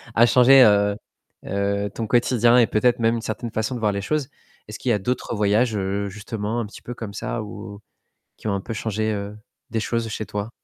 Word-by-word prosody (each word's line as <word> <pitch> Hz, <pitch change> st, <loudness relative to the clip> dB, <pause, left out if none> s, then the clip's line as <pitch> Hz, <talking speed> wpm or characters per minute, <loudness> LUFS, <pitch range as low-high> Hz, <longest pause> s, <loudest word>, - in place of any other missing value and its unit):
a 120 Hz, -, +7 dB
changé, 130 Hz, +2 st, +7 dB
heu 100 Hz, -1 st, +4 dB, 0.5 s
heu, 100 Hz, +1 st, -1 dB
ton 115 Hz, -2 st, -3 dB
quotidien 120 Hz, 0 st, +4 dB
et 120 Hz, -, +5 dB
peut-être 120 Hz, +3 st, +2 dB
même 115 Hz, +1 st, +2 dB
une -, -, -4 dB
certaine 110 Hz, +1 st, -4 dB
façon 110 Hz, +4 st, -2 dB
de 120 Hz, -, -4 dB
voir 105 Hz, -, +2 dB
les 100 Hz, -, -2 dB
choses. 145 Hz, +4 st, -2 dB, 0.4 s
Est-ce 105 Hz, -, -8 dB
qu'il 130 Hz, -, -2 dB
y -, -, +4 dB
a 105 Hz, -, +1 dB
d'autres 125 Hz, +2 st, -2 dB
voyages, 105 Hz, +3 st, +2 dB
heu, 100 Hz, +1 st, -2 dB
justement 110 Hz, +2 st, -4 dB
un 115 Hz, -, -3 dB
petit 105 Hz, -, -12 dB
peu 120 Hz, -, -7 dB
comme 105 Hz, -4 st, -7 dB
ça 110 Hz, -, -3 dB
ou 100 Hz, 0 st, -9 dB, 0.6 s
qui -, -, -7 dB
ont 100 Hz, -, +1 dB
un 100 Hz, -, -3 dB
peu 115 Hz, -, -6 dB
changé, 110 Hz, 0 st, -2 dB
heu, 100 Hz, +1 st, -5 dB, 0.3 s
des 115 Hz, -, 0 dB
choses 115 Hz, 0 st, -1 dB
chez 110 Hz, 0 st, -4 dB
toi? 105 Hz, +2 st, -4 dB
110 Hz, 225 wpm, -23 LUFS, 100-120 Hz, 0.6 s, a